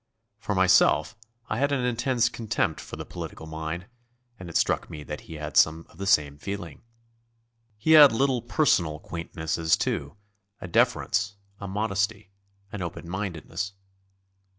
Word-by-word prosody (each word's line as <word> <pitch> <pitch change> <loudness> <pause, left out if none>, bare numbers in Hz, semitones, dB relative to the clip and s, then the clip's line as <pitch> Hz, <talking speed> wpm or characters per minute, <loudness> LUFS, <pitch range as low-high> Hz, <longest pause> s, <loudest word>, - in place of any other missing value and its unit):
For - - -2
myself, - - +4 0.3
I 110 - -2
had 140 +1 +2
an 135 -3 0
intense 120 0 +1
contempt 115 -3 -1
for - - -8
the - - -7
political 80 - -8
mind, 80 +2 -5 0.5
and 90 -2 -8
it 85 - 0
struck - - +1
me 75 -1 -8
that 75 +1 -6
he 80 - -10
had 75 -2 -6
some 80 +1 +4
of 85 - -20
the 100 - -3
same 75 -5 +3
feeling. 100 -5 -6 1.0
He 135 +9 0
had 150 -3 +10
little 130 +1 +1
personal 100 - +2
quaintnesses, 80 -1 -1
too, 70 +7 -2 0.4
a - - -7
deference, 110 -2 +1 0.2
a 100 - -6
modesty, 100 0 -1 0.4
an 105 - -5
open 85 -1 -6
mindedness. 95 0 -4
95 Hz, 150 wpm, -26 LUFS, 80-115 Hz, 1.0 s, had